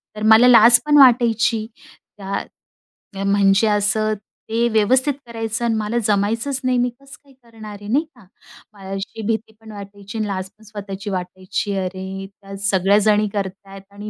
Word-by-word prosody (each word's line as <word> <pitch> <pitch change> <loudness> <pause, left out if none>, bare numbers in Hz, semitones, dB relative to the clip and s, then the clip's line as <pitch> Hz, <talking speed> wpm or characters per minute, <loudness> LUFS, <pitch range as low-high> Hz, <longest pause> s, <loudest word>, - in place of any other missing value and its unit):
तर 210 - -8
मला 225 +3 +7
लाज 240 0 +7
पण 295 0 +4
वाटायची. 235 -4 +4 0.5
त्या 195 0 -4 0.8
म्हणजे 200 +1 +3
असं 215 +1 +1 0.4
ते 230 +1 +1
व्यवस्थित 250 +6 +2
करायचं 225 0 -4
आणि 230 -1 0
मला 215 +2 -2
जमायचंच 225 +6 0
नाही 255 -1 +1
मी 245 0 +1
कसं 275 +3 -15
काय 280 -1 -22
करणार 220 -3 -11
आहे. 205 - -10
नाही 295 +6 +2
का? 240 -5 -19 0.5
मला 195 -2 -12
अशी 195 +3 -6
भीती 220 -1 -3
पण 220 -1 -12
वाटायची 200 +1 -10
आणि 215 -1 -2
लाज 190 -1 -4
पण 220 - -21
स्वतःची 205 -1 -8
वाटायची. 185 +2 -4
अरे! 190 +1 -5
त्या 195 0 -13
सगळ्याजणी 205 +2 +2
करत 195 -2 -2 0.2
आहेत 195 0 -11
आणि 205 +1 -8
215 Hz, 160 wpm, -20 LUFS, 200-230 Hz, 0.8 s, मला